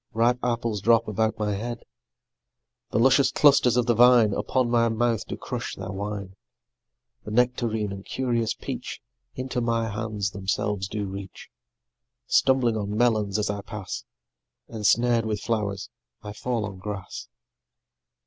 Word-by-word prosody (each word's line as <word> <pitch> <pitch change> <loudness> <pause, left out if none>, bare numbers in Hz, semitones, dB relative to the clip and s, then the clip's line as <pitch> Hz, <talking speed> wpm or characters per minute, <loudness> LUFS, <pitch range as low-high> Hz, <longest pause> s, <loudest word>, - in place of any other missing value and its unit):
Ripe 120 +2 +3
apples 115 -4 -1
drop 115 +1 +4
about 110 +1 0
my 105 -1 -1
head; 115 +4 -5 1.1
The - - -1
luscious 135 +3 +4
clusters 135 -5 +5
of 125 - +3
the 120 - +3
vine 120 -2 +6
Upon 130 +3 0
my 120 -1 +3
mouth 115 0 0
do - - -5
crush - - -5
their 95 0 -6
wine; 100 -1 -5 0.9
The - - -8
nectarine 115 -2 +1
and 100 0 -7
curious 120 -3 -1
peach - - -6 0.4
Into 130 -1 -3
my 115 -1 0
hands 105 -2 -3
themselves 100 0 -2
do 105 0 -3
reach; 95 0 -8 0.8
Stumbling 125 -4 +3
on 105 0 -3
melons 110 -4 +2
as 105 -1 0
I 100 0 -4
pass, 100 -2 -6 0.6
Ensnared 115 +1 +2
with 105 -2 -1
flowers, 105 -4 -2 0.3
I 105 -1 -6
fall 115 0 -2
on 95 -2 -8
grass. 100 -1 -6
110 Hz, 140 wpm, -25 LUFS, 105-120 Hz, 1.1 s, vine